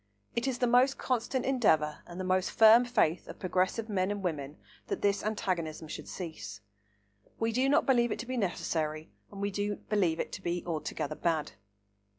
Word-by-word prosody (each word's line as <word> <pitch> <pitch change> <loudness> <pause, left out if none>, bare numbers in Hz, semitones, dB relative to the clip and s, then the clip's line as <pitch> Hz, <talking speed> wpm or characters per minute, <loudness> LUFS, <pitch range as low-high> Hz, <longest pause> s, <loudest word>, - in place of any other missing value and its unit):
It 235 +3 0
is 260 -2 0
the 250 - +2
most 250 +3 +4
constant 250 +1 -1
endeavour 160 - +2
and 175 +1 -8
the - - -2
most 185 0 +1
firm 225 +2 +7
faith 210 -9 +1
of - - -9
progressive 185 +4 0
men 190 -3 0
and 205 -1 -3
women 150 -4 -3 0.3
that - - -3
this 200 0 +2
antagonism 175 -7 -2
should - - -7
cease. 170 -4 -7 0.8
We 225 0 +1
do 255 +4 +2
not 295 +3 +4
believe 240 -3 +3
it - - -1
to - - -5
be 255 +1 -4
necessary 160 -7 -2 0.2
and 200 - -9
we 200 0 -1
do 205 +1 -1
believe 185 -7 0
it - - -3
to - - -6
be 175 0 -2
altogether 155 -3 -3
bad. 160 -1 -1
200 Hz, 185 wpm, -30 LUFS, 170-235 Hz, 0.8 s, firm